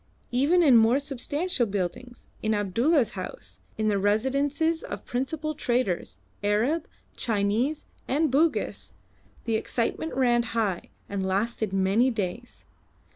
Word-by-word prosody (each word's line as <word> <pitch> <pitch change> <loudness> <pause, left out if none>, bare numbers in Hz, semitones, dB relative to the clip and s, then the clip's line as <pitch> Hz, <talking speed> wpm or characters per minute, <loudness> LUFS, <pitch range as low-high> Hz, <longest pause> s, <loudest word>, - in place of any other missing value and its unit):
Even 290 +9 +3
in 265 -7 +7
more 225 +3 +5
substantial 280 +1 -1
buildings, 205 +5 -4
in 220 0 +1
Abdulla's 235 - +2
house, - - -8 0.2
in 215 0 0
the 205 -2 +2
residences 275 +10 +1
of - - -7
principal 310 +5 -2
traders, 235 - -1 0.2
Arab, 235 +11 +1 0.3
Chinese, 225 +7 0 0.2
and 295 +2 +1
Bugis, 310 +4 0 0.5
the 225 -2 +1
excitement 240 +8 -2
ran 240 -2 +3 0.2
high, 200 -6 -1 0.2
and 200 -1 -3
lasted 205 +2 -1
many 195 +6 +3
days. 225 +1 -5
240 Hz, 120 wpm, -26 LUFS, 205-280 Hz, 0.5 s, in